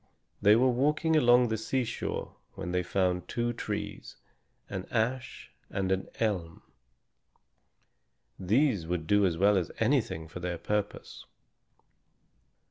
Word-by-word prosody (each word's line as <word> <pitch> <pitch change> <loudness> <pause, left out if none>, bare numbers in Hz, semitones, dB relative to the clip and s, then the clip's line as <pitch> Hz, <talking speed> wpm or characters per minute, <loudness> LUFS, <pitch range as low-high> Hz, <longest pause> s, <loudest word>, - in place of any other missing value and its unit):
They 105 +1 +6
were 125 +3 +4
walking 150 +6 +1
along 125 -4 +5
the 110 -1 -1
seashore 120 +2 -3 0.2
when 90 - -5
they 90 0 +1
found 90 0 0
two 120 0 -1
trees, 115 - -5 0.5
an 95 -2 -5
ash 120 +3 -2 0.2
and 95 -1 -2
an 95 0 0
elm. 90 -7 -2 1.8
These 105 - +2
would 85 -2 -2
do 100 +3 +4
as 85 -2 -2
well 100 +3 +4
as 90 - -1
anything 80 0 0
for 80 +3 -8
their 90 -1 -3
purpose. 105 +4 -4
100 Hz, 125 wpm, -29 LUFS, 90-120 Hz, 1.8 s, They